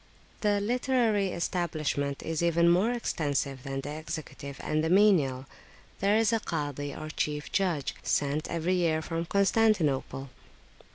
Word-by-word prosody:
The 205 -1 +2
literary 230 -2 +1
establishment 155 -5 -2
is 160 -1 -2
even 170 0 +3
more 185 +7 +3
extensive 145 - -1
than 135 0 -4
the 145 - -6
executive 145 -3 -7
and 155 0 0
the 160 - 0
menial. 170 -10 +4 0.5
There 200 +2 +3
is 225 +1 +3
a 225 - +2
Kazi, 145 -6 -3
or 155 +2 -7
chief 150 -1 -2
judge, 175 -8 0
sent 145 +2 0
every 170 +2 0
year 165 -3 +1
from 165 +1 -3
Constantinople. 180 - +1
165 Hz, 135 wpm, -29 LUFS, 145-200 Hz, 0.5 s, menial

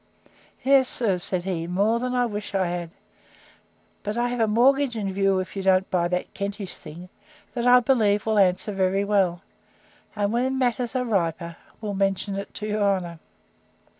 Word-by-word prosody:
Yes, 265 -1 +4
sir, 200 -7 0
said 175 0 0
he, 175 -3 -3
more 205 +6 +1
than 250 +1 -2
I 245 0 +2
wish 210 -3 -5
I 190 -1 +2
had. 175 -1 -3 1.1
But 210 +2 -4
I 240 0 +1
have 245 0 -3
a 225 - +3
mortgage 255 +4 +3
in 200 -3 -3
view, 195 0 +2
if 185 +1 -4
you 195 - -3
don't 190 0 +2
buy 175 -2 +2
that 180 +1 -3
Kentish 200 -1 -5
thing, 165 +3 -11 0.5
that 240 -1 -1
I 250 0 +7
believe 215 -5 +2
will 220 -1 +2
answer 190 +2 +2
very 195 0 +1
well; 190 -3 +1 0.7
and 205 0 0
when 260 +3 0
matters 250 -1 -1
are 250 -1 0
riper, 170 -5 -1 0.3
will 210 -2 -3
mention 195 0 0
it 200 0 -5
to 210 - -5
your 210 0 -1
honour. 185 -5 0
200 Hz, 180 wpm, -24 LUFS, 185-235 Hz, 1.1 s, I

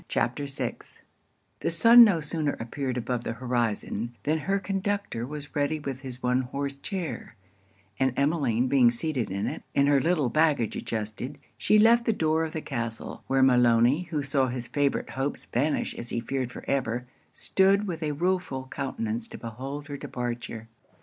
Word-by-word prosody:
CHAPTER 140 +4 -1
VI 135 - -3 0.8
The - - -1
sun 230 +9 +9
no 200 -7 +4
sooner 150 0 -1
appeared 130 +2 -3
above 120 0 -2
the 115 - -3
horizon, 120 -1 -2
than 155 +2 +1
her 195 +5 0
conductor 195 - -2
was 145 0 -8
ready 145 +2 0
with 135 -3 -5
his 130 -2 -7
one 125 +1 +2
horse 140 +2 -3
chair: 175 +5 -5 0.6
and 130 0 +3
Emmeline 140 -5 +2
being 130 -2 +5
seated 125 0 -2
in 100 +2 -2
it, - - -4
and 140 0 +4
her 140 -1 +4
little 155 -4 +2
baggage 150 -5 +2
adjusted, 110 +5 -4 0.2
she 215 - +3
left 230 +2 +5
the 225 - +3
door 160 -3 +1
of 160 - -4
the 160 - -3
castle; 115 -4 -4
where 135 0 +3
Maloney, 125 +5 +4
who 150 -4 -1
saw 135 -1 +2
his 125 -1 -4
favourite 145 +1 0
hopes 135 +2 -3
vanish 145 +6 0
as 120 - -6
he - - -1
feared 130 +1 -3
for - - -9
ever, 125 -3 -1 0.3
stood 195 +2 +2
with 170 -4 -4
a 150 -2 -1
rueful 170 -5 -1
countenance 115 -4 -3
to - - -9
behold 135 +6 -6
her 145 -1 -5
departure. 120 -3 -5
135 Hz, 170 wpm, -27 LUFS, 120-155 Hz, 0.8 s, sun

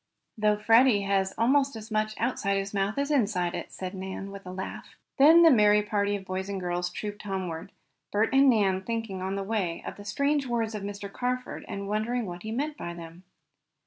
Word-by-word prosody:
"Though 210 -1 +2
Freddie 225 +1 +5
has 195 -1 +1
almost 275 +3 +3
as 220 0 -9
much 215 0 0
outside 215 -4 0
his 195 +1 -3
mouth 200 +3 -1
as 280 +1 0
inside 200 -10 +1
it," - - -6
said 185 -1 -6
Nan, 190 +1 -6
with 195 -1 -10
a - - -5
laugh. 185 +1 -7 0.2
Then 320 +5 +8
the 330 - +8
merry 210 -3 +5
party 205 -1 0
of 195 -1 -6
boys 190 +1 -4
and 195 -1 -3
girls 180 0 -2
trooped 205 +3 -6
homeward, 190 -3 -4 0.4
Bert 215 +5 +1
and 270 0 +6
Nan 195 -5 +3
thinking 225 -3 -4
on 190 +1 -2
the 200 - -2
way 195 -5 -2
of - - -6
the 205 - -10
strange 280 +6 0
words 230 -2 -1
of 210 - -4
Mr. 200 0 -6
Carford 250 0 -3
and 200 0 -5
wondering 220 +3 -1
what 175 -2 -7
he 220 - -6
meant 290 +6 -2
by 170 0 -6
them. 170 +2 -11
205 Hz, 210 wpm, -28 LUFS, 190-230 Hz, 0.4 s, Then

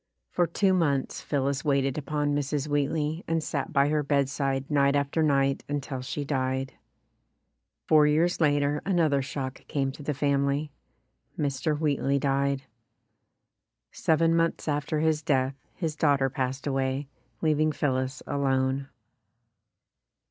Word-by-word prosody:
For 175 - +2
two 190 +3 +2
months 145 -7 0
Phillis 140 -1 -1
waited 140 -3 +1
upon 145 0 -1
Mrs. 145 0 -1
Wheat 145 -1 +1
ley 155 +2 -2
and 165 -1 0
sat 140 -3 -3
by 140 0 +3
her 150 0 +1
bedside 140 -1 0
night 140 -1 +3
after 140 +3 0
night 135 -3 +2
until 140 -2 -3
she 145 +3 -4
died. 130 -1 -1 1.1
Four 150 -1 +6
years 165 +4 +2
later 145 -1 +2
another 165 -7 +2
shock 130 0 -5
came 135 -2 -1
to 140 - -11
the 145 0 -2
family 140 +1 0 0.7
Mr. 145 +1 -1
Wheatley 140 -2 +1
died. 140 0 0 1.3
Seven 165 +1 +2
months 165 0 0
after 150 +1 -1
his 160 -1 +2
death 135 -4 +1 0.2
his 160 -4 -3
daughter 140 -3 +2
passed 130 +1 -3
away, 135 0 -1 0.4
leaving 155 0 +3
Phillis 130 -2 -1
alone. 135 -1 0
145 Hz, 130 wpm, -27 LUFS, 135-150 Hz, 1.3 s, Four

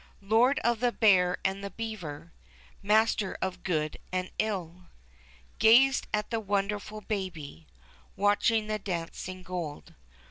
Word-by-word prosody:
Lord 225 +7 +3
of 235 -1 +2
the 245 0 0
hear 180 -4 +5
and 195 +1 -1
the 200 - -4
beaver. 170 -7 -7 0.5
Master 210 -1 +2
of 185 -1 -3
good 155 -4 -1
and 185 0 -2
ill. 180 -5 -3 0.7
Gazed 250 +5 +5
at 210 +1 -1
the 225 -1 -1
wonderfid 205 +1 -2
Baby 160 - -5 0.5
Watching 205 +2 +2
the 215 0 -2
dancing 185 0 -5
gold. 175 -5 -6
200 Hz, 120 wpm, -29 LUFS, 180-220 Hz, 0.7 s, hear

